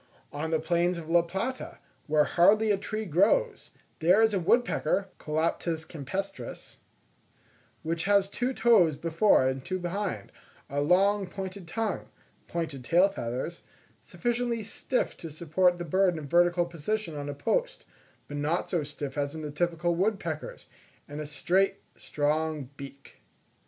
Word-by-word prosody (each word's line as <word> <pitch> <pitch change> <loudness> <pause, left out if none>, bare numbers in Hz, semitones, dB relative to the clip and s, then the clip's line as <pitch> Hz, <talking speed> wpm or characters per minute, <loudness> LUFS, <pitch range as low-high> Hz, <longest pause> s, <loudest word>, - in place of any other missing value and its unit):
On 150 +2 -3
the 160 -1 +1
plains 170 +2 +1
of 165 -1 -7
La 170 0 +6
Plata, 195 +10 -4 0.3
where 150 0 +4
hardly 210 +7 +4
a 200 - +2
tree 215 +2 -4
grows, 200 - +2 0.3
there 180 +6 +5
is 220 -1 +3
a 195 - +2
woodpecker 195 -2 +1
(Colaptes 160 +1 -1
campestris) 185 +7 -6 1.1
which 165 +1 -2
has 200 -1 +4
two 245 +6 -2
toes 215 - +4
before 165 -2 +3
and 130 0 -2
two 185 - -2
behind, 180 - -3 0.4
a 145 +1 0
long 195 +5 +3
pointed 190 0 -7
tongue, 220 +3 -3 0.4
pointed 155 -6 -4
tail 175 +9 +4
feathers, 130 0 -4 0.4
sufficiently 240 -1 -2
stiff 245 +4 -1
to 165 - -8
support 170 +3 +1
the 175 - -5
bird 185 +3 +3
in - - -4
a - - -9
vertical 175 +3 +3
position 170 +2 -3
on 145 0 -5
a 145 - -4
post, - - -1 0.4
but 145 - -6
not 155 +4 -1
so 175 -4 +1
stiff 145 -1 -5
as 145 +2 -2
in 155 - -6
the 150 - -4
typical 170 +2 0
wood 195 +4 +1
peckers, 160 -4 -6 0.4
and 145 +1 -6
a 150 - -5
straight, 190 +6 +1 0.2
strong 150 -2 -1
beak. 140 0 -12
170 Hz, 150 wpm, -28 LUFS, 155-195 Hz, 1.1 s, La